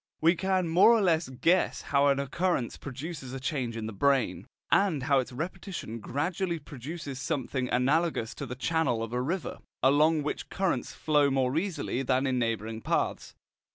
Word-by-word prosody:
We 165 +2 +5
can 185 0 0
more 175 +6 +6
or - - +1
less 165 -5 +2
guess 170 +8 +1
how 140 0 +3
an 140 -1 +3
occurrence 140 -1 -1
produces 135 -1 -7
a 135 - -4
change 130 -4 -2
in 110 - -4
the 110 - -5
brain, 125 -4 +1 0.2
and 185 -9 +3
how 140 0 +3
its 130 - -3
repetition 165 - -5
gradually 170 - -2
produces 145 -1 -7
something 130 -2 -2
analogous 135 -1 +1
to 140 - -6
the 125 - -5
channel 130 -4 0
of 115 +1 -6
a 125 - 0
river, 165 +7 -3 0.2
along 150 +3 +4
which 150 - -4
currents 190 -2 -1
flow 150 -2 +2
more 135 -1 +1
easily 165 -7 -1
than 130 +1 +1
in 130 -2 +1
neighbouring 115 -1 -2
paths. - - -1
140 Hz, 170 wpm, -29 LUFS, 125-165 Hz, 0.2 s, more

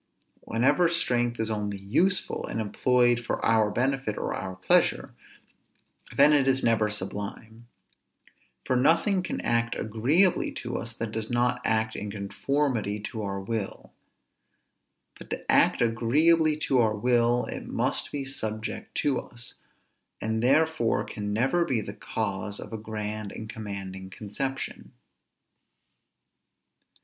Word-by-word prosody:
Whenever 135 +9 +2
strength 120 -8 +1
is 110 0 0
only 105 -2 -2
useful, 170 - +1
and - - -3
employed 120 +2 +2
for 120 - -3
our 110 -2 +4
benefit 130 0 -1
or - - -2
our 95 -1 -5
pleasure, 95 - +2 1.0
then 145 +2 +7
it 140 -2 +3
is 135 0 +3
never 110 -2 +3
sublime; 105 +3 -6 1.0
for 130 - +1
nothing 165 - +3
can 185 - -4
act 115 0 +1
agreeably 135 - +2
to 120 0 -5
us, 115 - -3
that 115 -1 -3
does 110 0 -3
not 125 +1 +1
act 110 0 +1
in 105 - -5
conformity 110 +2 -1
to 110 +2 -6
our 100 -1 -3
will; 100 +1 -5 1.3
but - - -11
to - - -2
act - - +4
agreeably 150 +8 +3
to 135 -4 +1
our 110 -2 +3
will, 120 +1 +2
it - - -6
must - - -1
be 140 -2 -3
subject 110 -4 -5
to 140 -3 +1
us, 120 0 -9 0.7
and 110 +1 -1
therefore 155 -1 +2
can 105 -1 -5
never 135 +11 +2
be 130 -9 0
the 105 - -6
cause 100 +1 -3
of - - -9
a - - -2
grand 105 -1 -5
and 110 0 -7
commanding 95 -3 -6
conception. 115 +8 -5
115 Hz, 135 wpm, -27 LUFS, 105-135 Hz, 1.3 s, then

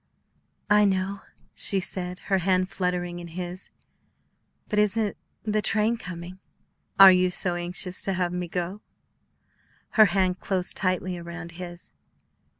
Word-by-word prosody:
"I 210 0 +6
know," 195 0 0 0.3
she 195 - +1
said, 180 -1 -3
her 195 -1 +1
hand 185 +1 +1
fluttering 175 -1 -2
in 170 - -8
his; 180 +2 -6 1.0
"but 210 - 0
isn't 210 0 +1 0.3
the 215 0 0
train 215 +3 +2
coming?" 180 -3 -8 0.6
"Are 195 -1 +11
you 185 0 +3
so 180 0 +2
anxious 180 +1 -2
to 195 - 0
have 180 -1 -1
me 180 0 -3
go?" 180 +4 -4 1.1
Her 215 - +6
hand 185 -1 +1
closed 185 -2 -1
tightly 185 -1 0
around 170 0 -8
his. 175 0 -8
185 Hz, 135 wpm, -26 LUFS, 175-195 Hz, 1.1 s, Are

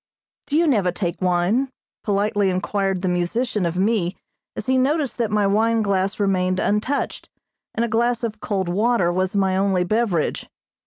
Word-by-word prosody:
"Do 295 - +1
you 340 - +4
never 210 - +2
take 175 -1 -3
wine?" 185 +9 +1 0.3
politely 205 -1 +1
inquired 195 0 -1
the - - +1
musician 180 +3 0
of 170 +1 -3
me, 195 -2 0 0.4
as - - -5
he 260 0 +2
noticed 275 +1 0
that 230 -3 +1
my 210 -1 +1
wine 220 +3 +2
glass 195 0 0
remained 185 -2 +1
untouched, 220 +7 -1 0.5
and 235 - +1
a - - -2
glass 235 +1 0
of 220 -2 -3
cold 195 -3 -2
water 195 -1 +1
was 185 +2 -1
my 190 -1 +2
only 190 -1 +2
beverage. 200 -4 -1
200 Hz, 165 wpm, -22 LUFS, 185-230 Hz, 0.5 s, you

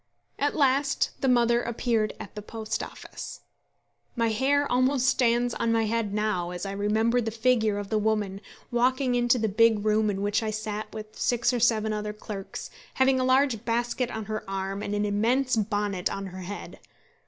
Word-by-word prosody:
At 290 0 +1
last 275 -1 +2
the 270 - +1
mother 240 -1 +4
appeared 230 -2 -1
at - - -9
the 210 - -6
Post 220 +1 -4
Office. - - -8 0.7
My 230 -2 +1
hair 275 +6 +2
almost 255 +1 +2
stands 240 -1 +2
on 230 - 0
my 225 0 +2
head 220 -1 -1
now 210 -4 -1
as 180 +1 -5
I 195 - -3
remember 220 +4 +1
the 225 - -2
figure 225 -2 +2
of 205 -1 -5
the 215 - +2
woman 210 -2 -1 0.3
walking 255 +2 +2
into 245 0 +3
the 225 -2 0
big 215 0 +3
room 215 0 +3
in 195 -1 -2
which 205 +2 +1
I 220 - -2
sat 215 0 -4
with 215 0 -8
six 240 0 +2
or 245 - 0
seven 220 -2 +2
other 210 0 -3
clerks, 210 -2 -7 0.2
having 265 0 +3
a - - +1
large 255 -3 +2
basket 240 +1 -1
on 220 -3 -5
her 215 0 -4
arm 195 +1 -3
and 205 0 -3
an 205 0 0
immense 235 +6 +1
bonnet 205 -3 -1
on 195 - -4
her 185 0 -8
head. 200 +3 -7
220 Hz, 190 wpm, -27 LUFS, 210-245 Hz, 0.7 s, mother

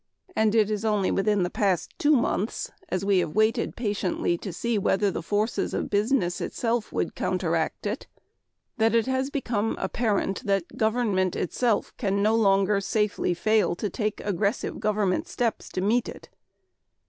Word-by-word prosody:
And 220 0 +2
it 215 -1 +3
is 210 0 -2
only 210 -3 +1
within 200 -1 +2
the 175 - -2
past 190 -5 0
two 300 -3 +4
months, 230 -3 -1 0.2
as 185 +1 -1
we 200 -2 +4
have 155 -3 -2
waited 215 +1 +2
patiently 205 -6 -1
to 195 - -5
see 225 +5 -1
whether 195 +1 +2
the - - -4
forces 210 +6 -1
of - - -3
business 205 -3 +1
itself 235 -2 -1
would - - -1
counteract 170 -2 -1
it, 210 +5 -3 0.7
that 225 +1 +3
it 230 - +3
has 260 +1 0
become 230 -6 -1
apparent 200 -1 -1
that 195 -3 0
government 220 -5 +1
itself 225 +4 0
can 200 -2 0
no 215 +1 +3
longer 200 -2 +3
safely 210 -4 0
fail 215 +1 +2
to 200 +2 -3
take 210 0 -2
aggressive 205 +2 -1
government 210 -3 0
steps 235 -3 -2
to 185 - -3
meet 225 +5 +1
it. - - -11
210 Hz, 160 wpm, -26 LUFS, 195-225 Hz, 0.7 s, two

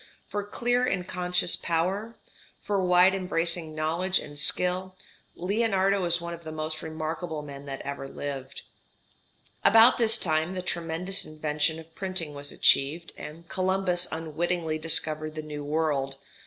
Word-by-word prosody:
For 205 - -3
clear 245 +4 0
and 195 -7 -1
conscious 180 -1 +1
power, 190 +7 -2 0.4
for 200 -2 -1
wide 180 +1 +5
embracing 170 -3 0
knowledge 170 +5 0
and 145 -1 -6
skill, 180 +5 +1 0.4
Leonardo 195 0 +1
is 170 0 +3
one 170 0 -6
of 170 0 -10
the 155 - -7
most 155 0 -4
remarkable 160 0 -5
men 140 -1 -10
that 135 -1 -6
ever 140 -1 -5
lived. 135 -1 -6 1.0
About 225 +3 +8
this 230 0 +6
time 160 -1 0
the 185 - -4
tremendous 175 +2 -2
invention 155 +1 -1
of 160 0 -13
printing 185 -5 -3
was 145 0 -5
achieved, 155 +5 +2
and 165 +3 -10
Columbus 185 -1 +1
unwittingly 160 0 -2
discovered 155 -1 +2
the 155 - -5
New 150 -1 -7
World. 145 -3 -1
165 Hz, 140 wpm, -27 LUFS, 155-185 Hz, 1.0 s, About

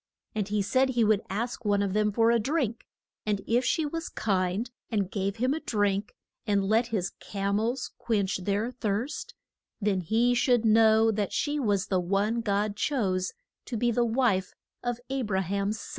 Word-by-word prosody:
And 210 -3 -1
he 210 -1 0
said 260 +6 +2
he 240 -3 +2
would 215 -1 +3
ask 235 +4 -3
one 205 -1 +2
of 195 -2 -1
them 210 0 +2
for 225 +2 +3
a 235 - +3
drink, 245 -2 -1 0.4
and 210 -2 0
if 240 +2 +2
she 320 +4 +1
was 330 +2 -4
kind 195 +3 -1 0.2
and 200 -4 -1
gave 195 -1 -1
him 255 +4 +1
a 315 - -2
drink, 205 -5 -1 0.3
and 200 -2 +2
let 225 +3 +3
his 205 -6 -2
cam 200 0 -1
els 235 +4 -2
quench 200 -4 0
their 200 +5 -1
thirst, 230 +2 -3 0.4
then 200 -3 +1
he 230 +8 +2
should 245 -1 +3
know 220 0 +5
that 205 -2 -1
she 295 0 0
was 205 -7 +1
the 185 - +1
one 200 +6 0
God 205 -1 0
chose 200 -7 0 0.3
to 240 - -4
be 240 +2 +2
the 240 +1 +2
wife 225 -6 +1 0.3
of 245 -1 -2
A 270 0 0
bra 200 -5 0
ham's 200 +3 -1
son. - - -9
215 Hz, 190 wpm, -28 LUFS, 200-240 Hz, 0.4 s, know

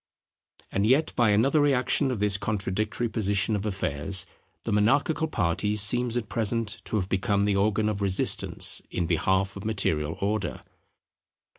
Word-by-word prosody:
And 100 +2 0
yet 135 +6 +2
by 120 -3 +3
another 125 +9 +3
reaction 140 0 +2
of 125 - -2
this 100 -1 0
contradictory 105 +3 -2
position 105 -2 0
of 105 +1 -3
affairs, 95 -1 -1 0.4
the 115 - -3
monarchical 140 +10 +2
party 105 - -1
seems 120 +3 +2
at 115 -3 -3
present 115 0 -2
to - - -4
have 95 -4 -1
become 100 +1 0
the 100 -1 +1
organ 105 +2 +1
of 105 -1 -2
resistance 95 -2 +2
in 85 - -2
behalf 95 +4 0
of 100 - -8
material 80 -8 -1
Order. 100 -2 -2
105 Hz, 150 wpm, -26 LUFS, 95-115 Hz, 0.4 s, by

